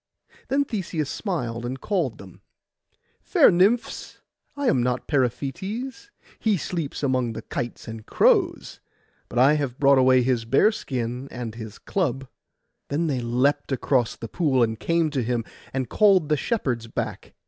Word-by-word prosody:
Then 280 +1 +1
Theseus 175 - -3
smiled, 120 - -3
and 130 +2 -4
called 170 - -1
them, 95 -2 -13 0.8
'Fair - - +5
nymphs, 200 +7 +1 0.4
I 285 - -2
am 130 - +3
not 125 +1 -1
Periphetes. 190 - -2 0.3
He 215 -3 +2
sleeps 165 -4 -4
among 130 -4 +1
the - - -7
kites 120 0 -5
and 110 -1 -7
crows; - - +2 0.5
but - - -6
I 135 +4 +6
have 140 -5 -2
brought 140 -1 +5
away 130 -1 +5
his 125 -2 +1
bearskin 130 - 0
and 120 -3 -6
his 110 -2 -8
club.' 135 -8 -2 0.6
Then 150 +4 0
they 140 -5 0
leapt 130 +5 0
across 130 -2 +1
the 115 - -7
pool, 135 -2 +2
and 110 -1 -1
came 165 -2 +1
to 135 -3 0
him, 120 -1 -1 0.3
and 130 -2 -2
called 190 - +4
the 155 - +4
shepherds 130 - -1
back. - - -5
135 Hz, 150 wpm, -24 LUFS, 120-170 Hz, 0.8 s, I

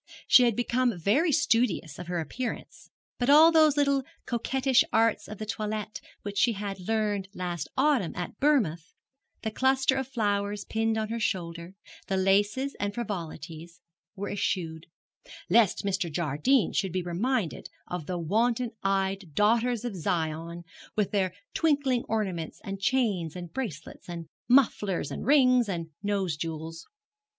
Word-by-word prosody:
She 250 - +7
had 235 -3 +2
become 245 -2 +1
very 245 - +2
studious 230 - +1
of 175 - -7
her 175 -1 -2
appearance, 230 - -5 0.3
but 245 +1 +1
all 310 +3 +8
those 310 -3 +5
little 280 -1 +3 0.2
coquettish 260 +2 +2
arts 225 0 +2
of 215 - -8
the 215 - -5
toilet 215 0 -4 0.2
which 205 -1 -3
she 235 - +4
had 200 -1 -5
learned 210 -3 0
last 175 -4 -3
autumn 265 - +2
at 180 +3 -6
Bournemouth, 215 - +1 0.5
the 220 - -2
cluster 265 +2 +2
of 265 -2 -2
flowers 205 -4 -1
pinned 225 0 0
on 215 -1 -2
her 230 +1 -2
shoulder, 170 -3 -3 0.3
the 195 - 0
laces 205 +8 +2
and 205 0 -2
frivolities, 170 -6 -6 0.4
were 200 0 -4
eschewed; 165 -5 -2 0.6
lest 220 -4 +4
Mr. 190 -4 -1
Jardine 170 - +1
should 190 -2 0
be 185 +1 -2
reminded 190 +3 -2 0.2
of 175 -4 -5
the 180 - -2
wanton 230 +8 +1
eyed 195 -4 -1
daughters 230 +2 +2
of 235 -5 -3
Zion, 165 0 -2 0.3
with 210 -2 0
their 190 -3 +1 0.2
tinkling 280 -6 +1
ornaments, 190 -7 -2
and 195 0 -6
chains, 200 - 0
and 175 -2 -8
bracelets, 195 - -6
and 170 -1 -5 0.2
mufflers, 225 -7 +3
and - - -5
rings, 255 -5 +5
and 165 -3 -4
nose 200 -5 -1
jewels. 165 +1 -6
205 Hz, 145 wpm, -28 LUFS, 175-245 Hz, 0.6 s, all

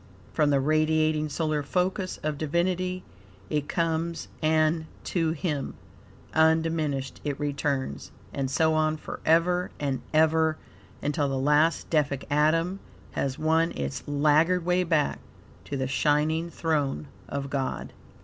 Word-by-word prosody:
From 150 -2 +3
the 140 -1 +3
radiating 155 +1 +2
solar 155 0 -1
focus 185 +4 -1
of 150 -1 -2
Divinity 180 +3 0 0.5
it 150 -1 -1
comes, 165 0 -1
and 155 0 +2 0.2
to 165 -3 0
him, 150 -4 -3 0.6
undiminished 160 -4 +1
it 145 -2 -3
returns, 140 - -2 0.2
and 135 -1 -2
so 160 +4 +2
on 155 0 +1
forever 170 +4 +1
and 140 -3 -1
ever; 160 0 +3 0.5
until 145 -1 0
the 135 - -1
last 150 +4 +2
Deific 145 -4 +1
atom 165 +5 +2 0.3
has 135 -1 -2
won 160 +1 +2
its 70 -1 -3
laggard 155 +5 +3
way 180 +1 +2
back 160 -4 +1 0.5
to 140 - -4
the 130 - -1
shining 150 +5 +1
throne 145 - -1 0.2
of 140 0 -4
God. 135 -2 -3
155 Hz, 125 wpm, -27 LUFS, 145-165 Hz, 0.6 s, From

